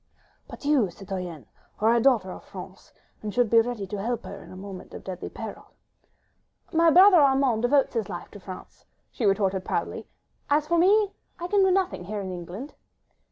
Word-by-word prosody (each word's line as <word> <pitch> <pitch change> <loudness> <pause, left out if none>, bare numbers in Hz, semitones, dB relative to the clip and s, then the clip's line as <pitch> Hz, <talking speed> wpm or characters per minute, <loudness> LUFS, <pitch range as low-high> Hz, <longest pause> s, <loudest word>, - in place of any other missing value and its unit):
"But - - -11
you, 280 -9 +3
citoyenne, 180 -4 -7 0.3
are 220 +2 +4
a 235 - +3
daughter 225 -8 +3
of - - -9
France, 190 +1 -11 0.3
and 215 - -4
should 245 0 +1
be 230 -1 +7
ready 230 -3 -4
to 195 +1 -5
help 235 +3 -2
her 200 - -8
in - - -14
a - - -10
moment 190 -1 -9
of - - -9
deadly 185 -2 -6
peril." - - -9 1.0
"My 330 0 +5
brother 370 +3 +8
Armand 270 -6 +3
devotes 270 +3 +3
his 225 -5 -2
life 175 - -7
to 205 - -11
France," 185 -1 -11 0.3
she 230 - -1
retorted 195 -1 +1
proudly; - - -3 0.4
"as 295 +1 +3
for 340 +2 +2
me, 405 +3 +4 0.3
I 345 - -4
can 405 +2 +3
do 380 - +4
nothing... 370 - 0
here 210 +3 -4
in 190 -1 -5
England. 180 - -7
225 Hz, 190 wpm, -26 LUFS, 190-290 Hz, 1.0 s, brother